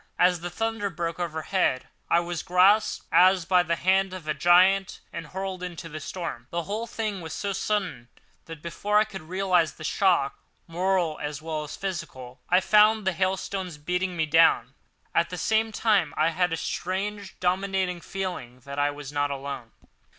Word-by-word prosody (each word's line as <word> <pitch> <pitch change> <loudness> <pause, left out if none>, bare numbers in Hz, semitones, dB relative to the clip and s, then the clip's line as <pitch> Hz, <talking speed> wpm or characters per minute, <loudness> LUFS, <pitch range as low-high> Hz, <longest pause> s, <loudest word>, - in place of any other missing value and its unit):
As 180 -1 +4
the 175 +1 -5
thunder 225 +2 -2
broke 170 -1 -4
overhead, 160 -4 0 0.2
I 170 - +4
was 175 -1 -4
grasped 190 +4 +3
as 185 -1 +5
by 180 +1 +4
the 170 -1 0
hand 190 +1 +2
of 175 -4 -9
a 155 - +1
giant 185 +4 +4
and 165 - -6
hurled 190 0 -5
out 180 - -2
into 170 -1 -8
the 155 0 -6
storm. 155 -7 -6
The 170 0 -2
whole 215 +6 -4
thing 215 -4 -3
was 160 -2 -7
so 200 +4 -2
sudden 185 - -2 0.4
that, 165 -2 -10
before 205 +5 0
I 210 - +6
could 195 -3 -8
realise 180 0 +1
the - - -11
shock, 170 -5 +1 0.3
moral 175 -2 0
as 150 -1 -4
well 155 -1 -4
as - - -7
physical, 130 -9 -6
I 180 +1 +5
found 215 +1 +5
the 190 - +2
hailstones 185 -1 -2
beating 180 +4 -2
me 160 - +2
down. 165 +2 +4 0.4
At - - +2
the - - -5
same 220 0 +1
time 205 -8 +1
I 155 +1 +3
had 180 +1 0
a 165 - -1
strange, 195 +3 -4
dominating 185 -1 0
feeling 170 -12 -5
that 140 +3 -6
I 145 0 +3
was 145 -1 -7
not 145 0 0
alone. 140 -4 -6
180 Hz, 180 wpm, -26 LUFS, 160-195 Hz, 0.4 s, I